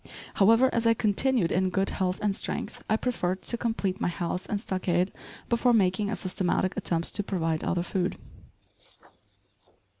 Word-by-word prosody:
However, 230 +5 +4
as 230 0 +1
I 230 - +5
continued 215 -2 +2
in 185 +1 +2
good 195 +1 0
health 185 -1 -1
and 205 -2 +1
strength, - - -4
I 220 - +3
preferred 190 -7 -2
to - - +2
complete 225 -5 -2
my - - +1
house 175 +1 -3
and 205 - -1
stockade 185 -2 -1 0.3
before 240 +1 +2
making 200 -1 +2
a 215 - -1
systematic 185 0 -1
attempt 170 -1 -1
to 205 - 0
provide 165 -5 -1
other 175 -1 0
food. 180 0 -2
190 Hz, 155 wpm, -27 LUFS, 180-225 Hz, 0.3 s, I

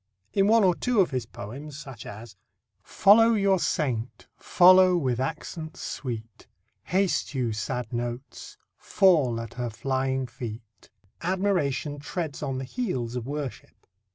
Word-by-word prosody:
In 195 0 +3
one 225 0 +5
or 185 -2 +5
two 245 +5 0
of 185 - +3
his 125 -4 -3
poems, 135 +9 -8
such 135 -6 -9
as: 105 +1 -10 0.5
Follow 225 +3 +5
your 195 -2 +3
saint, 125 -8 -2
follow 185 0 +6
with 130 -7 -1
accents 160 +3 -5
sweet; 115 -5 -6 0.4
Haste 185 -5 0
you, 120 -4 0
sad 125 +2 -4
notes, 120 +2 -5 0.2
fall 150 -12 +3
at 115 -2 -7
her 120 -1 -3
flying 130 +2 -1
feet, 115 -2 -9 0.3
admiration 170 -6 0
treads 155 0 -5
on 135 -3 -2
the 130 - -4
heels 130 - -3
of 125 -1 -4
worship. 145 -2 -6
135 Hz, 135 wpm, -26 LUFS, 120-180 Hz, 0.5 s, follow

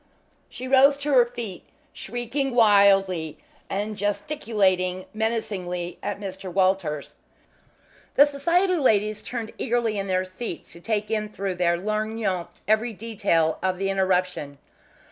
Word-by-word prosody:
She 255 - -7
rose 275 +2 +6
to 285 0 -2
her 245 -2 +6
feet, 235 -6 -7 0.3
shrieking 245 +4 -3
wildly, 195 -7 +4 0.3
and 210 +2 -2
gesticulating 200 -5 0
menacingly 195 -6 -3
at 205 0 -4
Mr. 190 -2 -6
Walters. 185 -6 0 1.0
The 285 - +8
Society 345 +6 +1
ladies 215 -6 +2
turned 230 -2 -5
eagerly 230 -3 0
in 195 - -3
their 185 0 0
seats 185 +1 -7
to 170 - -12
take 215 +1 -2
in 215 -1 -1
through 195 -2 -3
their 175 -1 +1
lorgnons 215 -2 -2 0.2
every 220 +2 +2
detail 190 -7 0
of 185 -1 0
the 195 +1 -1
interruption. 180 -6 0
205 Hz, 125 wpm, -25 LUFS, 185-230 Hz, 1.0 s, The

